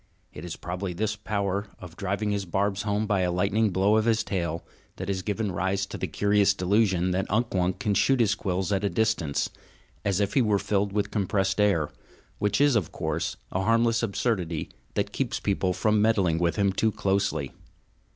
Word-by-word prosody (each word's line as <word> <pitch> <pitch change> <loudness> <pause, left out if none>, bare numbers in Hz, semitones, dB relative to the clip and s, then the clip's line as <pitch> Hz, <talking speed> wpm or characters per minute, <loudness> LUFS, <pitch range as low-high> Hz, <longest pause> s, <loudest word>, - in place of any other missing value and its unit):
It - - -9
is 90 -2 -5
probably 90 +1 -4
this 105 +4 -1
power 100 -1 -2
of 90 -2 -11
driving 100 +3 -2
his 100 -1 -1
barbs 95 +2 0
home 105 +1 0
by 105 -2 +1
a 90 -1 +1
lightning 100 +5 +2
blow 100 +3 +3
of 110 - +2
his 115 -1 +2
tail 85 -6 -2 0.3
that 95 +1 -5
has 95 -1 -1
given 105 +1 -2
rise 95 +3 0
to - - -8
the - - -3
curious 100 -1 +2
delusion 95 -2 +2
that 95 +2 -1
Unk 115 +3 0
Wunk 90 -1 +1
can 105 - 0
shoot 135 +6 +3
his 110 -4 +3
quills 95 -2 -2
at 100 0 +1
a 100 - +2
distance, 110 -11 0 0.5
as 100 -1 +1
if 100 0 0
he 135 - +4
were 105 -3 +3
filled 100 0 0
with 100 0 -1
compressed 100 -1 0
air 90 -8 +2 0.5
which 105 +2 +1
is, 145 -2 +4
of 100 -8 0
course, - - -2
a 95 - 0
harmless 115 +2 +3
absurdity 100 -7 -1 0.2
that 100 0 -1
keeps 135 -4 -1
people 95 -2 0
from 105 +3 +2
meddling 100 -7 +2
with 85 -1 +1
him 100 -2 +2
too 110 +3 +1
closely. 95 -9 0
100 Hz, 195 wpm, -26 LUFS, 95-105 Hz, 0.5 s, he